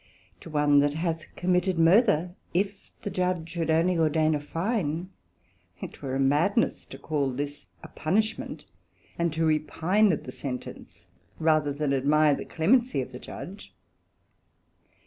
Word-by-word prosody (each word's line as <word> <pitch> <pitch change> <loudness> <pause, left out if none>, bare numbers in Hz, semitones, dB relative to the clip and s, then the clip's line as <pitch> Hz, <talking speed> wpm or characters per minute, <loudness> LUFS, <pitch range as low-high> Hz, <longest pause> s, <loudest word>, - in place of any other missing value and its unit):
To - - -11
one 145 -2 +4
that 145 +1 +2
hath 165 -1 -2
committed 180 0 +1
Murther, 175 0 +4 0.2
if 195 +2 -2
the 205 - -3
Judge 180 -3 -1
should 165 -2 -3
only 165 +2 +2
ordain 155 0 +2
a 150 - 0
Fine, 170 +1 -2 0.7
it - - -8
were 135 -2 -3
a - - -1
madness 150 - +2
to - - -10
call 145 -4 -1
this 145 +3 -4 0.2
a - - -8
punishment, 215 +7 -2 0.5
and 170 -1 +1
to 160 +1 0
repine 160 +7 +2
at 155 - -2
the 125 - -7
sentence, 125 -1 -7 0.3
rather 155 -2 +2
than 145 0 -1
admire 145 +3 +3
the - - -4
clemency 235 - +2
of 130 0 -4
the 125 - -8
Judge. 195 +8 -10
160 Hz, 145 wpm, -27 LUFS, 145-180 Hz, 0.7 s, one